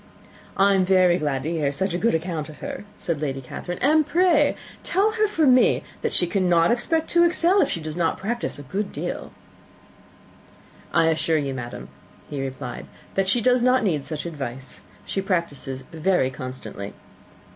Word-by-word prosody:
"I 200 +1 +5
am 190 -1 +3
very 185 -1 +4
glad 140 -3 -1
to 160 - -2
hear 150 -4 0
such 190 +5 -1
a - - 0
good 230 -3 +2
account 160 -2 -3
of 150 - -11
her," 280 -6 -6
said 165 -4 -3
Lady 135 -3 -2
Catherine; 175 +7 -6
"and 310 +3 +5
pray 350 +3 +3 0.3
tell 405 +3 +2
her 430 -1 +2
from 315 -10 +4
me, 255 - +4 0.2
that - - -1
she - - +2
cannot 175 -2 +3
expect 320 +7 0
to 345 0 +5
excel, 345 +3 +4
if - - +2
she - - -2
does 155 -1 -6
not 170 -2 0
practise 235 +4 -3
a 145 - -9
great 195 +9 -3
deal." - - -5 1.6
"I 165 -1 +4
assure 160 0 +1
you, 140 -2 -1
madam," 120 -2 -7 0.4
he 140 -2 -3
replied, 130 -2 -6 0.3
"that 195 -1 +1
she 235 +5 +2
does 250 +1 +3
not 255 0 +3
need 160 -9 0
such 155 +1 -5
advice. 135 -5 -6 0.2
She 195 - -2
practises 145 -8 -2
very 165 -4 +1
constantly." 125 -6 -7
175 Hz, 180 wpm, -24 LUFS, 145-235 Hz, 1.6 s, I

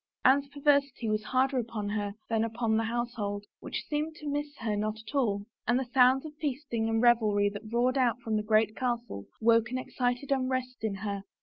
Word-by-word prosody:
Anne's 275 +2 +5
perversity 280 -3 +1
was 215 0 0
harder 260 +2 +2
upon 220 -3 -3
her 205 -1 -2
than 225 -1 +1
upon 225 0 0
the 225 0 +1
household, 225 -3 -3
which - - -5
seemed 305 +1 -2
to 300 - -8
miss 290 0 -3
her 220 -2 -1
not 215 +1 -1
at 220 +4 -11
all, 205 -8 +1 0.2
and 240 - +3
the 265 - -1
sounds 260 +2 +5
of 305 - -7
feasting 270 -6 -2
and 225 +1 +1
revelry 215 -4 +4
that 210 +2 -9
roared 250 +3 +2
out 245 -2 +2
from 225 -2 -2
the 215 - +1
great 215 0 +2
hall 240 - -2
woke 230 0 +4
an 255 - -2
excited 250 +1 -2
unrest 255 -1 0
in 215 -3 -1
her. 200 0 -4
235 Hz, 200 wpm, -29 LUFS, 215-260 Hz, 0.2 s, Anne's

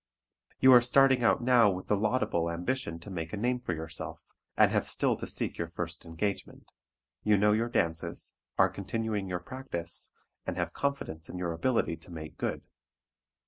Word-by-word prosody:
You 130 0 +8
are 120 - +9
starting 130 +1 +5
out 115 - +3
now 120 -3 +6
with 95 -1 -3
the 105 - +2
laudable 100 -6 +1
ambition 85 +2 -2
to 100 - -9
make 80 -1 -5
a - - -2
name 125 +4 0
for 95 -9 -3
yourself, 80 0 -4 0.4
and - - +6
have - - +1
still - - +1
to - - -5
seek - - -3
your 85 - -1
first 85 0 -5
engagement. 90 +5 -4 0.5
You 105 -1 +4
know 105 +1 +4
your 115 +3 +1
dances, 85 -5 -1 0.2
are - - +6
continuing 105 0 -3
your 90 -1 -2
practice, 85 -7 -4 0.3
and - - -4
have - - -2
confidence 80 - -3
in 90 - -6
your 90 -1 -2
ability 85 -1 0
to 85 +2 -11
make 80 -2 -8
good. - - -2
100 Hz, 180 wpm, -30 LUFS, 85-120 Hz, 0.5 s, are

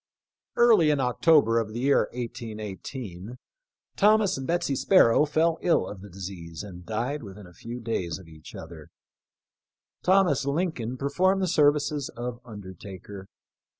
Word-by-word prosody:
Early 225 -10 +5
in 145 -2 +2
October 125 -2 +3
of 110 -1 -4
the 120 - -4
year 140 +2 +3
18 115 -2 -6
18, 105 - -7 0.6
Thomas 210 -1 +4
and 135 -1 -6
Betsy 170 -4 0
Sparrow 150 -4 +4
fell 160 +2 +1
ill 175 - +2
of 100 -2 -8
the 100 - -11
disease 90 -2 -8
and 90 -3 -10
died 120 +9 -3
with 100 -3 -10
in 105 - -11
a 90 - -15
few 120 +7 -8
days 110 -8 -3
of 95 -3 -14
each 80 -1 -13
other. 80 -2 -10 1.1
Thomas 180 -8 +3
Lincoln 140 -5 -2
per 140 +2 -3
formed 190 +4 +2
the - - +1
services 145 -3 +2
of 120 0 -5
undertaker. 95 -2 -10
120 Hz, 150 wpm, -26 LUFS, 100-150 Hz, 1.1 s, Early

